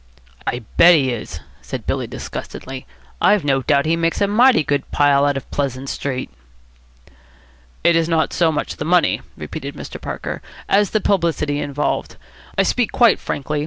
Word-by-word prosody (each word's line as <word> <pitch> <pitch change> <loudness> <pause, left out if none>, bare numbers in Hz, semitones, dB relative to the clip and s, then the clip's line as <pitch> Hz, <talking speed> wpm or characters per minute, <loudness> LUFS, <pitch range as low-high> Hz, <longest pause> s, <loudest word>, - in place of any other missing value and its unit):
"I 120 0 -2
bet 175 +1 +8
he 135 -4 +2
is," 105 -9 -6 0.2
said - - -6
Billy - - -2
disgustedly. 130 0 -7 0.3
"I've 205 -7 +4
no 135 -2 +2
doubt 140 +1 +2
he 160 +1 +2
makes 165 0 0
a 200 - +3
mighty 235 -1 +5
good 145 -1 -1
pile 145 -1 +3
out 145 -1 0
of 135 - -8
Pleasant 135 -1 -2
Street." 130 -2 -4 1.5
"It 170 - +5
is 165 0 +2
not 160 -1 +1
so 165 -2 +3
much 150 - -3
the - - -3
money," 175 +3 +2 0.2
repeated - - -6
Mr. - - -8
Parker, - - -5 0.3
"as 200 0 +3
the 215 - 0
publicity 165 -7 0
involved. 145 0 -2 0.4
I - - +4
speak 245 -3 0
quite 235 -4 +4
frankly. 150 +2 -3
150 Hz, 165 wpm, -20 LUFS, 140-175 Hz, 1.5 s, bet